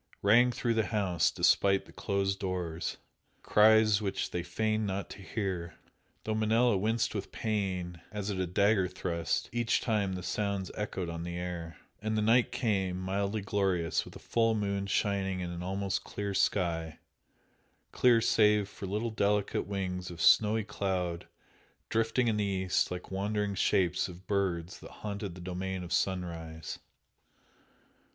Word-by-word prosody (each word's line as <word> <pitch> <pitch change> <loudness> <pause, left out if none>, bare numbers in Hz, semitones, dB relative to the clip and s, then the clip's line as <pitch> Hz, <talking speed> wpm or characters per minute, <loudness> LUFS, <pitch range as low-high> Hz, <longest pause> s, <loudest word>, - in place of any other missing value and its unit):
rang 120 +5 +6
through 120 -1 0
the 110 -1 +1
house 95 -6 +1
despite 95 -1 +3
the - - -15
closed 100 -1 -1
doors, 90 -3 -3 0.5
cries 110 -1 +5
which 100 -2 -2
they 90 - -1
feigned 110 +5 -1
not 100 0 -3
to - - -9
hear, 95 -5 -3 0.5
though 110 - -1
Manella 110 +2 +3
winced 110 +4 0
with 100 - -4
pain, 95 -6 -2
as 105 -1 -3
at 95 - -3
a 95 - 0
dagger 100 +1 +3
thrust, 85 -3 -2
each 120 0 +1
time 105 -5 0
the 90 -1 -5
sounds 100 0 -2
echoed 95 -4 -3
on 85 0 -5
the 85 0 -4
air. 85 -2 -5 0.2
And 110 0 -1
the 105 - +1
night 115 +3 +4
came, 100 -7 0
mildly 100 +3 -1
glorious, 95 -4 0
with - - -13
a - - -6
full 115 -1 +1
moon 100 -1 -1
shining 95 -2 0
in 90 -1 -3
an 85 0 -5
almost 95 +1 -2
clear 100 -1 -4
sky 85 -4 0 0.9
clear 120 -2 +4
save 105 -2 +4
for 100 -1 -8
little 105 +4 -2
delicate 105 -2 0
wings 95 -2 -3
of 85 -1 -9
snowy 110 +5 +5
cloud 90 -4 -2 0.6
drifting 115 +2 +1
in 110 -2 +1
the 105 - +1
east 95 -2 +1
like 90 +1 -6
wandering 100 +1 -1
shapes 95 -2 +2
of 90 +1 -11
birds 95 -4 -1
that - - -11 0.2
haunted 100 -3 -4
the 90 - -10
domain 95 +1 -4
of 90 - -5
sunrise. 85 -4 -2
100 Hz, 155 wpm, -31 LUFS, 90-105 Hz, 0.9 s, rang